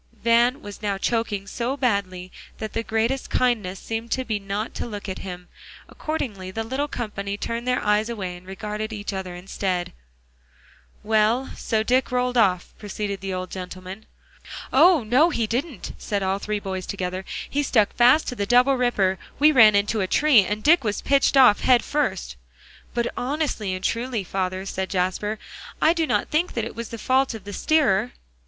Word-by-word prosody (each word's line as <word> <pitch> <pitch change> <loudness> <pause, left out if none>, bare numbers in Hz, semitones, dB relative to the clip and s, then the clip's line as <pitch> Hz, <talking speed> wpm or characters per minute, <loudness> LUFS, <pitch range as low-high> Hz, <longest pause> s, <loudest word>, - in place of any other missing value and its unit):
Van 240 +3 +3
was 205 0 -9
now 200 -2 -1
choking 210 -2 -1
so 240 +6 -3
badly 190 -8 -1 0.3
that 220 - -6
the 225 - -1
greatest 230 +4 -1
kindness 210 -7 0
seemed 225 +1 -5
to 260 +1 -1
be 215 -3 -1
not 200 +2 -4
to - - -4
look 205 -3 -7
at 190 - -5
him. 180 -1 -8 0.4
Accordingly 215 -12 -4
the 225 +4 -3
little 265 +6 -2
company 205 -6 -4
turned 235 +3 -4
their 250 0 +2
eyes 210 +2 +2
away, 190 -6 -4
and 180 +1 -14
regarded 210 +2 -5
each 205 -1 -5
other 190 -2 -5
instead. 180 0 -3 1.1
"Well, 220 +4 +2
so 220 -2 -1
Dick 250 +3 +1
rolled 250 0 0
off?" 190 -6 +2
proceeded 205 -1 -4
the 195 -1 -3
old 185 0 -5
gentleman. 185 +2 -8 0.7
"Oh! 350 -7 +6
no, 255 +10 +4
he 235 -9 0
didn't," 245 - -3
said 200 -2 -2
all 190 +1 0
three 210 0 -2
boys 190 -2 -5
together; 185 -1 -3 0.2
"he 290 - -1
stuck 225 -7 +2
fast 250 +6 +5
to 250 - -5
the 200 -3 -2
double 250 +4 +5
ripper; 195 -7 +1 0.2
we 300 +2 +6
ran 220 -7 +7
into 205 +1 +1
a 190 - 0
tree, 280 -2 +5
and 210 +3 -3
Dick 325 0 +5
was 210 -2 -2
pitched 275 0 +3
off 255 -6 +7
head 250 -2 +4
first." 190 - -2 0.6
"But 240 0 -1
honestly 260 -6 -2
and 185 - -8
truly, 235 -1 -1
father," 185 0 -3
said 190 -1 -3
Jasper, 190 +3 -1 0.4
"I 320 - +4
do 330 -2 0
not - - 0
think 320 +4 0
that 230 -2 -2
it - - -8
was 230 0 -6
the 230 - -6
fault 260 +2 +1
of 215 - -9
the 205 +1 -8
steerer." 245 -6 +2
215 Hz, 185 wpm, -24 LUFS, 195-250 Hz, 1.1 s, ran